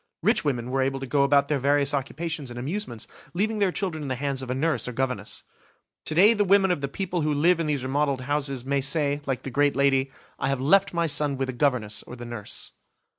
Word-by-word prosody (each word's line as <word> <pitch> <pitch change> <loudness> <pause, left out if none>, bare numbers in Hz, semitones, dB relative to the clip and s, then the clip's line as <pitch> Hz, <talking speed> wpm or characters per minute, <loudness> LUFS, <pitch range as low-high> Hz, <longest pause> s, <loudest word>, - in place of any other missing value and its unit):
Rich - - +3
women 125 -3 -1
were 135 0 +1
able 135 +1 0
to 135 - -5
go 140 +2 +1
about 140 0 +4
their 145 -2 0
various 140 +1 +2
occupations 145 +1 -3
and 120 - -8
amusements, 135 - -4 0.3
leaving 215 +4 0
their 200 -3 +2
children 180 -5 -3
in - - -4
the 130 - -1
hands 135 0 -2
of 130 - -7
a 125 - -1
nurse 155 +2 0
or - - -2
a - - -12
governess. 125 -6 -3 0.6
To 155 - -2
day 205 +7 +7
the 205 -2 +2
women 195 -1 +4
of 175 - -1
the 140 - -1
people 180 +2 -3
who 155 0 +1
live 165 +4 +3
in 165 - -1
these 145 -4 -1
remodeled 140 0 0
houses, 140 -2 -2
may 140 0 +1
say, 145 +1 0
like 135 -2 -2
the 135 - -5
great 145 +2 +2
lady, 135 -1 +2 0.3
"I 135 - 0
have 135 -1 0
left 195 +9 +4
my 170 -1 0
son 145 -2 +1
with 135 0 -2
the - - -2
governess 120 -6 0
or 120 - -10
the 120 -1 -8
nurse". 120 -3 -5
140 Hz, 245 wpm, -25 LUFS, 130-155 Hz, 0.6 s, day